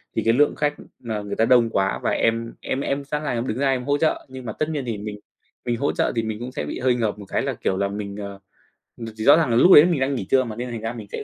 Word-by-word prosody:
thì - - +1
cái 115 - +4
lượng 145 +4 +3
khách 150 0 0 0.3
mà 110 -3 -4
người 100 0 -5
ta 115 - +2
đông 120 -1 +4
quá 95 -3 0
và - - +1
em 115 0 0
em 135 - -2
em 140 0 -2
sẵn 150 +2 -3
là 150 - -2
em 120 +1 -2
đứng 110 - -2
ra 140 0 +2
em 130 -1 -1
hỗ 145 +1 +1
trợ, 155 +1 0
nhưng 130 -1 -9
mà 110 - -4
tất 155 +6 -2
nhiên 145 -4 -3
thì 115 -3 -3
mình 105 0 -7 0.5
mình 120 -1 -1
hỗ 140 - 0
trợ - - 0
thì 115 - 0
mình 110 -1 -4
cũng 125 +2 -6
sẽ - - -4
bị - - -5
hơi 125 -1 +2
ngợp 110 -4 -2
một 100 - -9
cái - - -1
là, - - -2
kiểu 95 - -2
là, 100 0 0
mình, 100 0 -5
ờ 100 -1 -7 0.8
thì 110 - -4
rõ 145 +6 +7
ràng 165 -5 +1
là 115 - +1
lúc 175 +10 +6
đấy 150 - +10
mình 175 -5 +1
đang 135 +1 0
nghỉ 110 - -4
trưa 130 -1 +4
mà 115 -3 -6
nên 125 +2 -5
thành 115 -2 -5
ra 115 +1 -3
mình 110 -4 -9
sẽ - - -5
120 Hz, 320 wpm, -23 LUFS, 110-135 Hz, 0.8 s, đấy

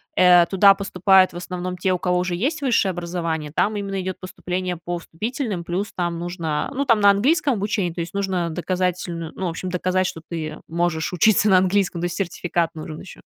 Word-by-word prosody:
э, 180 -1 +6
туда 195 +1 +6
поступают 190 -1 +3
в - - -7
основном 180 0 -5
те, 185 +1 +1
у - - 0
кого 180 0 0
уже 180 -1 -1
есть 290 - -1
высшее 235 -7 +2
образование, 170 -3 -3
там 215 +1 +1
именно 195 -1 -3
идет 185 0 -5
поступление 180 -1 -4
по 175 +1 -4
вступительным. 215 - -4
Плюс 185 +4 -3
там 175 -2 -2
нужно, 170 -3 -3
ну, 280 +2 0
там 230 -4 +4
на 205 0 +6
английском 275 +8 +3
обучение, 200 -4 -1
то 170 - -4
есть, 170 - -6
нужно 190 -4 -1
доказательн 175 -1 -2
ну, 190 - -3
в - - 0
общем, 180 +3 -5
доказать, 185 +1 0
что 165 - -4
ты 155 -2 -5
можешь 170 0 -1
учиться 210 +3 +4
на 185 - +6
английском, 185 -2 +1
то 175 - -1
есть, 175 - -3
сертификат 175 -3 -1
нужен 155 0 -7
еще 190 - -12
180 Hz, 200 wpm, -22 LUFS, 170-195 Hz, -, э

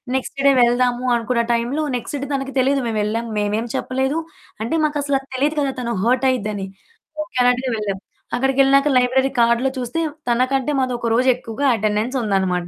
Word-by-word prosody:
Next 265 +1 -3
day 280 - +7
వెళ్దాము 245 +1 +1
అనుకున్న 235 +1 0
టైంలో 240 +6 -1
నెక్స్ట్ 240 +4 -4
డే 280 - -4
తనకు 270 0 -2
తెలీదు 270 +2 +2
మేవెళ్ళాం. 220 +1 -1
మేమేం 210 +2 0
చెప్పలేదు, 265 +3 -1 0.4
అంటే, 230 +9 -1
మాకసలది 285 -3 -1
తెలీదు 290 +4 +1
కదా 280 -2 0
తను 235 -1 -3
హర్టయ్యిద్దని. 235 -5 +1 0.6
ఓకే 305 -5 -10
అన్నట్టుగా 250 +1 +2
వెళ్ళాం. 200 -2 -3 0.4
అక్కడికెళ్ళినాక 270 +2 +3
లైబ్రరీ 260 +2 +2
కార్డ్‌లో 235 +3 +3
చూస్తే, 250 +6 -2 0.3
తనకంటే 255 +3 +1
మాదొక 245 -2 -1
రోజెక్కువుగా 250 +1 +1
అటెండెన్సుందనమాట. 210 -5 0
250 Hz, 135 wpm, -20 LUFS, 230-270 Hz, 0.6 s, డే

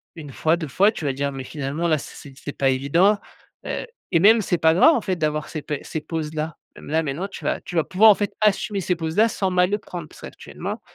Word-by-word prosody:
1 150 -4 -9
fois, 160 +4 +1
2 165 -2 -5
fois. 195 +10 +3
Tu 175 - -7
vas 140 - 0
dire: 140 +1 -2
«Mais 135 -1 -6
finalement, 145 +4 -3
là 155 -2 +3
c'est - - -10
c'est 140 - -11
c'est 135 - -18
c'est 145 - -6
pas 135 - +2
évident». 165 +11 +3 0.5
Heu - - -3 0.3
et 165 - +5
même 220 +4 +7
c'est 180 -3 0
pas 160 0 +4
grave 250 - +6
en 235 - 0
fait, 185 -3 -2
d'avoir 150 -1 -1
ces 155 - -5
pé 145 -1 -4
ces 155 - -4
pauses-là. 155 0 -4 0.2
Là, 160 +2 -1
maintenant 155 +6 -3
tu 200 - -10
vas - - -1
tu 190 -2 -9
vas 165 - +3
pouvoir 205 +7 +5
en - - +4
fait, 205 0 -2
assumer 210 -1 +1
ces 180 0 0
pauses-là 165 +7 +2
sans 195 -4 -1
mal 180 0 +3
le 205 - +1
prendre. 175 -5 -8
Parce - - -17
qu'actuellement, - - -7
165 Hz, 260 wpm, -23 LUFS, 150-190 Hz, 0.5 s, même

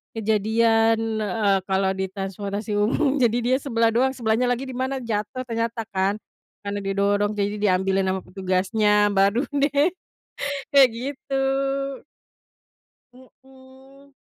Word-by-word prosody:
kejadian, 225 +1 +1
eee, 200 -1 +1
kalau 190 0 +1
di 190 0 -2
transportasi 200 +2 -4
umum 265 +7 +1
jadi 240 -2 +3
dia 255 +2 +2
sebelah 230 -4 +1
doang 260 +2 +3
sebelahnya 230 0 +1
lagi 245 +2 -1
di - - -8
mana 260 +1 -2
jatuh 225 +3 -3
ternyata 230 0 -2
kan 195 +1 +1 0.4
karena 200 0 -5
didorong, 200 +1 +1
jadi 205 0 -2
diambilin 195 -1 +1
ama 190 - -2
petugasnya 200 +3 +1
baru 200 +7 +2
deh 285 +4 +1 0.8
kayak 275 -2 +7
gitu. 270 +1 -3 1.7
Mhm. 265 +2 -19
220 Hz, 120 wpm, -23 LUFS, 200-255 Hz, 1.7 s, kayak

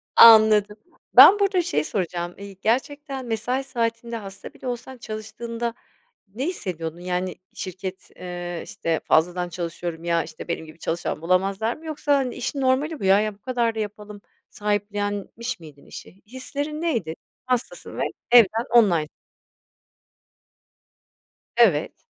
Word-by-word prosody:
Anladım. 215 -2 +8 0.4
Ben 415 - +10
burada 395 -2 +3
şey 150 - 0
soracağım. 175 -1 -3
İii, 200 -1 -10
gerçekten 270 +3 -1
mesai 240 +3 -1
saatinde 235 -2 -2
hasta 195 -3 -9
bile - - -9
olsan 250 +1 -5
çalıştığında 230 +1 -5 0.6
ne 260 +4 -2
hissediyordun? 170 - -4
Yani, 180 0 -2 0.2
şirket, 185 0 -7
eee, 175 -1 -6
işte, 165 -1 -2
"Fazladan 175 +2 +2
çalışıyorum, 170 -1 -5
ya, 170 -1 +1
işte, - - -10
benim 170 -1 -3
gibi 155 +1 -14
çalışan 165 -2 -3
bulamazlar 195 +6 +1
mı?" 320 - -15
Yoksa, 300 -2 0
hani, 260 -3 -2
"İşin 275 +2 -3
normali 275 +4 +1
bu - - -7
ya. 195 +1 +6
Ya, 215 -1 -1
bu - - -29
kadar 240 -2 0
da - - -3
yapalım." 210 -1 -6 0.3
sahiplenmiş 205 +3 -2
miydin 150 -4 -14
işi? 195 - -12
Hislerin 285 +5 -5
neydi? 230 - -1 0.3
Hastasın 255 - -3
ve - - -2 0.3
evden 230 -1 +6
online 180 -10 +5 2.5
Evet. - - +3
215 Hz, 135 wpm, -24 LUFS, 180-250 Hz, 2.5 s, Ben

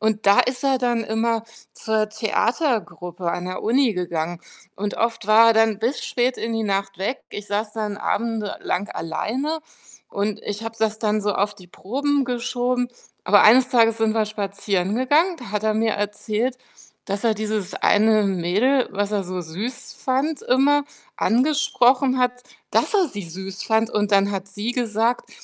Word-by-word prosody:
Und 220 -1 0
da 200 0 +6
ist 250 0 -2
er 270 -1 +3
dann 240 -2 0
immer 225 +1 0 0.3
zur 220 -1 -1
Theatergruppe 215 - -1
an 180 +1 -3
der 185 - -4
Uni 240 -1 +2
gegangen 175 -1 -3 0.4
und 205 +1 -3
oft 230 -2 -1
war 220 +2 +7
er - - +6
dann 220 -2 +3
bis 245 +6 -1
spät 250 +1 0
in 230 - -3
die 225 0 -1
Nacht 195 -1 -2
weg. 205 +8 -2
Ich 205 0 -7
saß 210 +1 -2
dann 210 -2 -3
Abende 220 -1 -2
lang 200 +3 -2
alleine 260 - -3 0.5
und 205 0 -2
ich 205 +1 -5
habe 225 0 -5
es 220 -1 0
dann 215 -1 +1
so 205 0 0
auf 205 +1 0
die 185 -3 -15
Proben 275 +10 -1
geschoben, 245 0 -1 0.4
aber 205 +2 +6
eines 250 +4 +6
Tages 230 -2 +3
sind 220 -1 +1
wir 220 -1 +2
spazieren 200 -1 -2
gegangen, 305 +8 +2
da 245 -7 -9
hat 210 0 -2
er 215 0 +1
mir 220 +1 +1
erzählt, 210 +4 -2 0.5
dass 200 +2 -3
er 225 -2 +3
dieses 215 -2 -3
eine 215 0 +3
Mädel, 200 +8 +1
was 205 +1 -2
er 205 -2 0
so 185 0 -4
süß 220 - -6
fand 275 +4 -1
immer, 285 +3 +3 0.3
angesprochen 260 0 +2
hat, 250 0 0 0.3
dass - - +2
er 385 -3 +4
sie 205 -6 -6
süß 190 +3 -7
fand. 220 0 +2
Und 210 -2 0
dann 200 0 +4
hat 195 -1 -4
sie 205 +4 -4
gesagt, 230 0 -1
220 Hz, 175 wpm, -22 LUFS, 200-245 Hz, 0.5 s, war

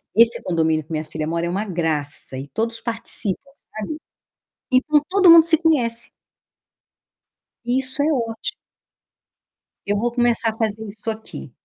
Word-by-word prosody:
Esse 230 +1 +4
condomínio 160 -3 0
que 155 - -18
minha 155 0 -2
filha 155 0 -5
mora 170 +1 -1
é - - -2
uma 190 +4 -1
graça 160 -8 0
e 135 - -6
todos 230 +8 -2
participam, 225 0 -3
sabe? 220 +1 -7 0.8
Então 295 +4 +3
todo 380 -1 +5
mundo 335 -1 +10
se 320 0 +4
conhece. 245 -8 +1 1.6
Isso 260 +3 -1
é 305 +2 +2
óti 230 - -2 1.3
Eu 205 +1 0
vou 240 +3 0
começar 240 -1 +2
a - - -4
fazer 220 -1 -2
isso 215 +3 -7
aqui. 215 - -8
225 Hz, 145 wpm, -21 LUFS, 170-255 Hz, 1.6 s, mundo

